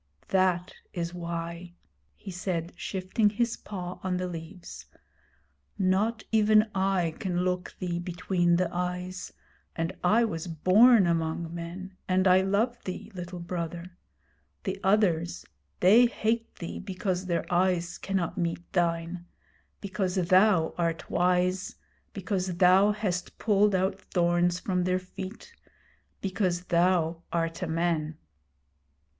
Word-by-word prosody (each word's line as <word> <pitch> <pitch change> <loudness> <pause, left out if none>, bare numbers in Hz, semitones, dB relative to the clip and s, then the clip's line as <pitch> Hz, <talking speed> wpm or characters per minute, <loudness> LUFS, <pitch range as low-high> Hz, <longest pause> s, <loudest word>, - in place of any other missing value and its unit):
'That 185 -2 +1 0.2
is 170 -1 -3
why,' 170 0 -5 0.4
he 195 - -9
said, 175 -2 -3
shifting 190 +3 0
his 230 +2 0
paw 180 -3 -7
on 185 -1 -1
the 185 - -2
leaves. 165 - -8 0.9
'Not 205 +4 +1
even 215 0 +4
I 190 -4 +1
can 180 -2 -1
look 180 0 -2
thee 175 -1 -2
between 175 0 +1
the 180 +1 +2
eyes, 180 +1 -3 0.4
and 165 +2 -2
I 220 +6 +4
was 165 -5 -4
born 195 +7 +5
among 165 0 -1
men, 180 +3 -7
and 185 +1 +3
I 185 0 +6
love 215 +5 0
thee, 185 +4 -6
Little 180 -1 -6
Brother. 175 0 -5 0.7
The 195 -1 -3
others 180 -4 +2 0.4
they 220 +7 +7
hate 230 0 -2
thee 170 - -6
because 185 -1 -3
their 170 -2 0
eyes 175 -1 +1
cannot 190 -1 -2
meet 170 0 -3
thine; 170 0 -1 0.5
because 195 -2 -2
thou 185 -1 +4
art 165 -1 -2
wise; 180 +1 +1 0.4
because 190 -2 -2
thou 190 +3 +6
hast 200 -4 -3
pulled 205 -2 +3
out 190 +1 0
thorns 175 -1 +1
from 180 -2 -1
their 185 0 +2
feet 185 +3 -8 0.7
because 185 -2 -1
thou 170 -2 +2
art 165 0 -1
a - - -1
man.' 160 -2 -1
180 Hz, 125 wpm, -28 LUFS, 170-190 Hz, 0.9 s, they